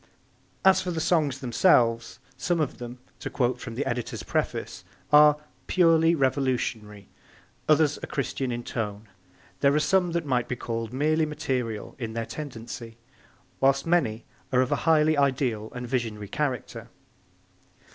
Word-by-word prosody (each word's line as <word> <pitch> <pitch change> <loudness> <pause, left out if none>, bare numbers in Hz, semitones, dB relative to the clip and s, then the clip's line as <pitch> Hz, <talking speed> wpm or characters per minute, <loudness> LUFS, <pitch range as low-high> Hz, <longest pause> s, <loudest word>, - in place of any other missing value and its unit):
As 190 -1 +6
for 185 - -4
the 165 -2 -2
songs 150 -5 +1
themselves, 120 -3 +3 0.2
some 175 +6 -1
of 150 -4 -2
them, 120 0 -7 0.2
to - - -5
quote 125 -1 0
from 115 -2 -7
the 140 - -2
editor's 120 0 -3
preface, - - -3 0.3
are 150 0 +7 0.3
'purely 165 -2 +4
revolutionary, 125 - -1 0.6
others 150 -1 +4
are - - -7
Christian 135 -1 -2
in 120 0 -4
tone; 105 -2 -4 0.5
there 140 0 +3
are - - +4
some 180 +2 +2
that 170 -2 -1
might 125 -4 0
be 125 - -2
called 115 -2 -4
merely 155 +4 +1
material 130 -8 -3
in 115 -3 -4
their 115 0 -3
tendency, 115 -4 -8 0.6
while 135 0 +4
many 120 -11 +1 0.3
are 125 -1 +4
of 130 - -1
a - - +4
highly 155 -1 +4
ideal 130 -6 0
and 125 0 -5
visionary 115 -5 -2
character.' 130 -1 -3
130 Hz, 145 wpm, -26 LUFS, 115-155 Hz, 0.6 s, are